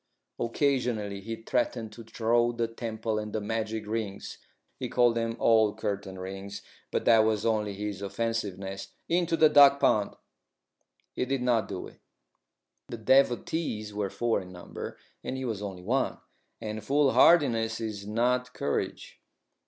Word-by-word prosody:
Occasionally 120 -5 0
he 115 +3 -5
threatened 115 -2 -1
to 115 +2 -10
throw 120 +1 +1
the 115 -1 -1
temple 110 -1 -3
and 105 0 -5
the 110 - 0
magic 110 +1 -3
rings 105 -2 -4 0.4
(he - - -3
called 120 -1 +4
them 115 0 -2
"old 110 -2 +4
curtain 100 -3 -3
rings," 95 +2 -7 0.3
but - - -2
that 115 -1 +6
was 110 -1 +2
only 105 -3 0
his 100 -1 -4
offensiveness) 100 -2 -3
into 170 -1 +1
the 160 - +7
duck 140 -1 +7
pond. 105 -6 +2 1.0
He - - -1
did 135 -1 -1
not 120 -3 +2
do 95 -2 -5
it. - - -14 0.9
The 120 - -6
devotees 120 -2 +1
were 100 -1 -2
four 115 +1 0
in 90 -1 -11
number, 90 -1 -8 0.3
and 130 - -3
he 130 - -4
was 110 -4 -3
only 95 -3 -6
one, 130 +7 0 0.4
and 110 -1 -5
foolhardiness 135 -4 +4
is 105 -3 -5
not 125 +3 0
courage. - - -3
110 Hz, 145 wpm, -28 LUFS, 105-120 Hz, 1.0 s, the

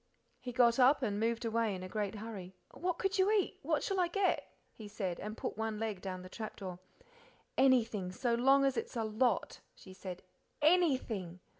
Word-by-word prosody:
He 250 - -6
got 240 0 +4
up 265 +2 +5
and 205 -3 0
moved 230 +1 0
away 225 -2 +1
in 185 - -7
a - - -5
great 205 +1 -2
hurry. 205 -4 -7 0.2
"What 360 -1 -2
could 390 0 0
you 380 +2 +4
eat? 420 -4 +1
what 305 0 0
shall 390 -1 -1
I 355 - +3
get?" 390 +2 0 0.2
he 215 - -10
said, 195 -4 -3
and 215 +2 -6
put - - -4
one 220 -1 -1
leg 215 -4 -3
down 185 -2 -5
the - - -8
trap 215 +3 -6
door. 185 -2 -7 0.8
"Anything 230 -8 +3
so 235 +5 0
long 270 +4 +5
as 270 -1 +1
it's - - -3
a 230 - 0
lot," 220 0 0 0.2
she 190 - -13
said 185 -1 -8 0.4
"ANYTHING! 260 - +2
225 Hz, 195 wpm, -34 LUFS, 200-270 Hz, 0.8 s, up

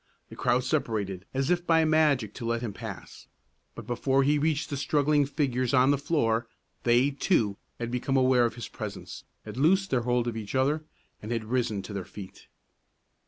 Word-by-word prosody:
The - - -10
crowd 125 +1 +1
separated 105 - -2
as 135 +4 0
if 175 0 0
by 160 -1 +4
magic 150 -9 +2
to 120 - -7
let 115 +1 -1
him 110 -4 -4
pass; - - -9 0.5
but - - -8
before 135 +3 +1
he 145 +2 +3
reached 155 +1 0
the - - -1
struggling 145 +1 +2
figures 130 -3 0
on 130 +1 +5
the - - +4
floor, 120 -6 0 0.3
they, 120 +4 +3
too, 115 - +1 0.2
had 120 0 -4
become 130 +2 0
aware 130 -2 +4
of 115 - -2
his 120 -3 -6
presence, - - -8 0.2
had 110 +1 -8
loosed 190 +7 +3
their 130 -2 +2
hold 120 0 0
of 120 - -2
each 110 +1 -5
other, 145 +4 +1 0.4
and 110 - -6
had 115 -2 -2
risen 110 -4 -1
to 100 - -8
their 100 -2 -3
feet. 95 +1 -11
130 Hz, 190 wpm, -28 LUFS, 115-145 Hz, 0.5 s, on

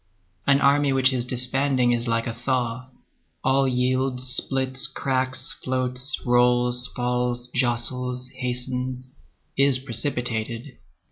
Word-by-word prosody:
An 140 0 +4
army 140 0 +3
which 130 0 +3
is 125 -2 -1
disbanding 125 0 +2
is 120 0 0
like 115 0 0
a 120 - -3
thaw. 125 +1 -2 0.5
All 135 +1 +3
yields, 130 0 0
splits, 130 -1 +1
cracks, 130 -1 -1
floats, 130 +2 -1
rolls, 125 0 +2
falls, 125 0 -1
jostles, 125 0 -1
hastens, 125 0 -2 0.4
is 140 -1 +4
precipitated. 120 -1 -3
125 Hz, 110 wpm, -24 LUFS, 125-130 Hz, 0.5 s, An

